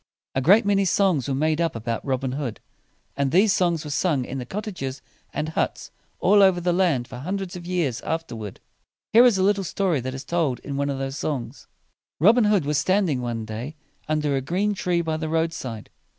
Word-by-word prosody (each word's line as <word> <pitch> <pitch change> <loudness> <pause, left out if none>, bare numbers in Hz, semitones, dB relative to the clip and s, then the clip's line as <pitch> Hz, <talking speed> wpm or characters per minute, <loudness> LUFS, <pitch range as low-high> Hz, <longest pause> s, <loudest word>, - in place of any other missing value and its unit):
A 130 - 0
great 200 - +5
many 200 -1 +3
songs 185 -7 +2
were 135 - 0
made 155 +3 +1
up 165 -5 0
about 115 0 -3
Robin 130 -1 -1
Hood, 130 -4 -4 0.6
and 140 -1 0
these 195 +4 +4
songs 170 -4 +1
were 150 - -5
sung 145 -3 +1
in 135 +2 -5
the 125 - -6
cot 210 +8 -4
ta 215 - -5
ges 135 -7 -5 0.3
and 150 +1 -3
huts 160 - -2 0.3
all 205 +2 +5
over 190 -2 +5
the 175 0 0
land 170 -10 +1
for 125 - -9
hundreds 185 +5 -4
of 175 -1 -8
years 165 -10 -1
after 165 -6 -3
ward. 105 -3 -7 0.5
Here 235 +3 +8
is 235 -6 +5
a 185 - +2
little 200 0 +2
story 185 -3 0
that 130 +1 -4
is 135 - -7
told 160 -7 0
in 140 - -5
one 140 +1 -1
of 140 - -2
those 135 +1 -4
songs: 140 -6 -4 0.5
Robin 220 - +5
Hood 205 -7 +3
was 150 -1 +1
standing 185 -9 +1
one 115 -2 -3
day 115 +8 -6 0.3
under 150 -2 +1
a 135 - 0
green 190 +9 0
tree 180 -3 0
by 160 -1 -1
the 160 0 -3
road 165 +1 0
side. 115 -8 -7
155 Hz, 220 wpm, -24 LUFS, 135-185 Hz, 0.6 s, Here